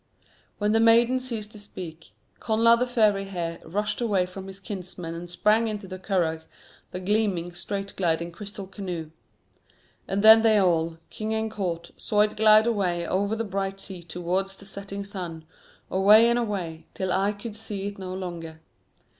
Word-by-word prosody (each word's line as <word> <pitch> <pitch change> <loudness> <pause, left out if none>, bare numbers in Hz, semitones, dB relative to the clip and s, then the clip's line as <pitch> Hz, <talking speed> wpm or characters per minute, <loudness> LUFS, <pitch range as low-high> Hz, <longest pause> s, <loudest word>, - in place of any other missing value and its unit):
When 210 0 +1
the 225 - +4
maiden 235 +3 +5
ceased 230 -5 -3
to 210 - -10
speak, 175 -5 -9 0.3
Connla 225 +1 +4
of 235 - +3
the 250 - +1
Fiery 215 -5 +2
Hair 170 -3 -4
rushed 210 +7 -2
away 200 -6 +2
from 190 +1 -9
his 195 0 -9
kinsmen 180 -4 -6
and 170 +1 -7
sprang 215 +5 +3
into 210 -2 -4
the 185 0 -7
curragh, 170 -5 0 0.5
the 180 - -5
gleaming, 185 -3 0
straight 200 +2 -5
gliding 170 -2 0
crystal 200 +2 -7
canoe. 180 -5 -6 1.0
And 200 +1 -1
then 220 +1 +10
they 220 -1 +5
all, 165 -4 +2
king 220 0 -3
and 220 0 -1
court, 170 -5 -3
saw 210 -1 +1
it 210 0 +2
glide 215 0 +6
away 185 -7 0
over 200 +4 0
the 225 - -2
bright 195 -1 -3
sea 190 -2 -8
towards 180 +3 -2
the 200 - -12
setting 200 0 -6
sun, 175 -5 -6 0.5
away 210 +4 +7
and 235 0 +3
away, 185 -8 -4
till 190 -1 -2
eye 200 +3 +2
could 210 +1 -8
see 210 -3 -5
it 200 -1 -5
no 185 -1 -5
longer. 170 -4 -6
195 Hz, 175 wpm, -26 LUFS, 180-215 Hz, 1.0 s, then